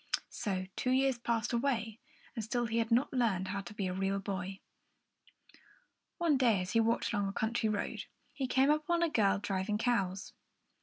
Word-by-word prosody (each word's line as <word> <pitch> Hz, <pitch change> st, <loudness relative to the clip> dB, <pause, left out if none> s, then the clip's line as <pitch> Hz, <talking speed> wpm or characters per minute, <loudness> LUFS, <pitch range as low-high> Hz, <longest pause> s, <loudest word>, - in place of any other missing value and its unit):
So 190 Hz, -4 st, -2 dB
two 250 Hz, -, -1 dB
years 260 Hz, -1 st, +2 dB
passed 230 Hz, -1 st, -1 dB
away, 235 Hz, -3 st, 0 dB, 0.3 s
and 225 Hz, -, -4 dB
still 240 Hz, +3 st, -1 dB
he 230 Hz, 0 st, 0 dB
had 225 Hz, -1 st, 0 dB
not 245 Hz, +5 st, +2 dB
learned 205 Hz, -7 st, +1 dB
how 200 Hz, +1 st, -2 dB
to 195 Hz, -, -10 dB
be 200 Hz, -, -2 dB
a 180 Hz, -, -1 dB
real 195 Hz, +1 st, 0 dB
boy. 195 Hz, -1 st, -4 dB, 1.6 s
One 330 Hz, -5 st, +3 dB
day, 235 Hz, -6 st, +3 dB
as 180 Hz, 0 st, -3 dB
he 230 Hz, -, +3 dB
walked 230 Hz, +1 st, +1 dB
along 205 Hz, -2 st, +1 dB
a -, -, -2 dB
country 220 Hz, +2 st, 0 dB
road, 210 Hz, -1 st, -2 dB, 0.3 s
he 270 Hz, -3 st, -2 dB
came 265 Hz, +3 st, +4 dB
upon 320 Hz, +3 st, +1 dB
a 335 Hz, -, +2 dB
girl 205 Hz, -8 st, +3 dB
driving 200 Hz, +1 st, -1 dB
cows. 200 Hz, -5 st, -1 dB
225 Hz, 185 wpm, -33 LUFS, 195-245 Hz, 1.6 s, came